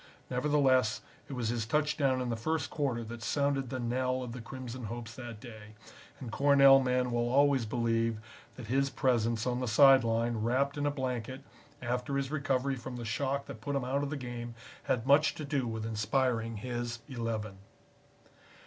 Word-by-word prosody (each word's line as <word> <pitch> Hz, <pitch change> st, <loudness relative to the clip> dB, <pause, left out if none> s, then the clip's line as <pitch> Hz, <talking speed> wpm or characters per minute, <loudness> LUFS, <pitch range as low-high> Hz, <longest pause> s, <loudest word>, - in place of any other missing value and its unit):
Nevertheless, 130 Hz, -3 st, +2 dB, 0.3 s
it -, -, -5 dB
was 120 Hz, -4 st, -2 dB
his 115 Hz, -2 st, -2 dB
touchdown 145 Hz, -1 st, +1 dB
in 125 Hz, -, -2 dB
the 115 Hz, -, 0 dB
first 155 Hz, +5 st, -2 dB
quarter 135 Hz, -6 st, -1 dB
that 115 Hz, +1 st, -8 dB
sounded 140 Hz, +1 st, 0 dB
the 130 Hz, -, -4 dB
knell 130 Hz, +2 st, -1 dB
of 125 Hz, -, -6 dB
the 120 Hz, +1 st, -7 dB
Crimson 125 Hz, 0 st, -7 dB
hopes 115 Hz, +1 st, -6 dB
that 120 Hz, -3 st, -8 dB
day, 110 Hz, -2 st, -11 dB, 0.4 s
and 125 Hz, -4 st, -7 dB
Cornell 140 Hz, 0 st, +6 dB
men 125 Hz, -1 st, +1 dB
will 120 Hz, 0 st, 0 dB
always 135 Hz, -2 st, +3 dB
believe 115 Hz, -1 st, 0 dB, 0.4 s
that 125 Hz, -, -8 dB
his 135 Hz, +4 st, +1 dB
presence 115 Hz, -4 st, +1 dB
on 125 Hz, -1 st, 0 dB
the 125 Hz, -, -2 dB
side 135 Hz, +3 st, +7 dB
line 115 Hz, 0 st, 0 dB
wrapped 130 Hz, +6 st, +1 dB
in 145 Hz, 0 st, -1 dB
a -, -, +3 dB
blanket, 130 Hz, -2 st, -3 dB, 0.4 s
after 125 Hz, +3 st, -1 dB
his 140 Hz, 0 st, -2 dB
recovery 135 Hz, -2 st, 0 dB
from 125 Hz, +1 st, -7 dB
the 120 Hz, -1 st, -6 dB
shock 140 Hz, +5 st, -1 dB
that 110 Hz, -, -9 dB
put 140 Hz, +5 st, -3 dB
him 135 Hz, -, 0 dB
out 135 Hz, +2 st, 0 dB
of 145 Hz, -, -2 dB
the 145 Hz, -, -3 dB
game, 120 Hz, -2 st, -6 dB, 0.3 s
had 115 Hz, -2 st, 0 dB
much 145 Hz, +2 st, +4 dB
to 150 Hz, -, -5 dB
do 140 Hz, -3 st, -1 dB
with 110 Hz, -1 st, -4 dB
inspiring 115 Hz, +1 st, 0 dB
his 120 Hz, +1 st, -4 dB
Eleven. 115 Hz, -6 st, -4 dB
125 Hz, 185 wpm, -31 LUFS, 115-135 Hz, 0.4 s, side